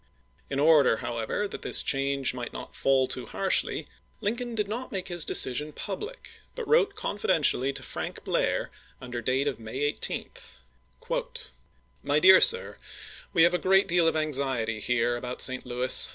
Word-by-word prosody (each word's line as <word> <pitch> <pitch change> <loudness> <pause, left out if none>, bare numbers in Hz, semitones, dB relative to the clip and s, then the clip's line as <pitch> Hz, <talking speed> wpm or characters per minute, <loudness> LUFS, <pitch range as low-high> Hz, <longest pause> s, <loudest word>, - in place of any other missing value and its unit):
In 140 - -2
order, 145 -6 +4
how 120 -1 -5
ever, 160 - -2
that - - -8
this - - +5
change 140 -2 0
might 125 -2 -6
not - - -9
fall 135 -1 +2
too - - -5
harshly, - - 0 0.3
Lincoln 235 +3 -3
did 210 -2 -1
not 235 +5 -5
make 190 -2 -4
his 175 -2 +1
decision 150 +4 +3
public, 320 - -8
but 475 -4 -6
wrote 425 -4 +3
confidentially 165 - +1
to - - -8
Frank - - -6
Blah*, - - -1 0.3
under 125 -1 -6
date 130 +4 0
of 140 - -3
May 115 +4 -7
18: 145 +1 -1 0.7
isei. - - -4 0.5
My 145 +1 0
Dear 185 +3 +8
Sir: 470 +2 +2 0.5
We 165 - +4
have 175 +1 +4
a 180 - +1
good 195 +3 +3
deal 170 -1 +2
of 165 - +1
anxiety 135 -7 -1
here 120 +1 0
about 125 +1 -6
St. 130 -1 +2
Louis. 125 +1 +4
150 Hz, 165 wpm, -27 LUFS, 130-200 Hz, 0.7 s, Dear